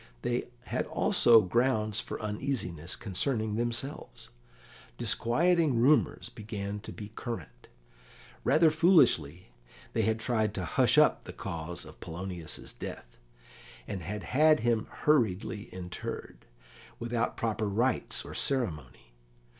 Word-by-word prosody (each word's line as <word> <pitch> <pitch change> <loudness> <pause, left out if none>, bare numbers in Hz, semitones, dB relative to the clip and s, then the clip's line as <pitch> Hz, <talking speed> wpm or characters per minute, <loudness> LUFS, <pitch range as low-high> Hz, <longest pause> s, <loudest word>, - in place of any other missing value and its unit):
They 120 0 -1
had - - -2
also 115 -2 +5
grounds 110 +1 +1
for - - -5
uneasiness 105 - -2
concerning 110 +1 -2
themselves; 120 +5 -4 0.7
disquieting 155 +1 +2
rumours 140 +6 +3
began 105 -1 -5
to 105 - -9
be 105 -1 -8
current. 110 - -7 0.8
Rather 160 0 +5
foolishly, 90 - +3 0.4
they - - +1
had 110 0 +1
tried 110 -3 0
to 90 - -3
hush - - +3
up - - +4
the - - -8
cause 85 +1 -5
of - - -13
Polonius's 85 -1 -6
death, - - -9 0.7
and 100 -3 -4
had 105 +6 -5
had 155 +1 +4
him 115 -1 +1
hurriedly 110 -7 +1
interred, 90 -8 -7 0.5
without 120 0 -2
proper 110 -1 -1
rites 120 +5 0
or - - -8
ceremony. 75 - -1
110 Hz, 115 wpm, -30 LUFS, 90-125 Hz, 0.8 s, also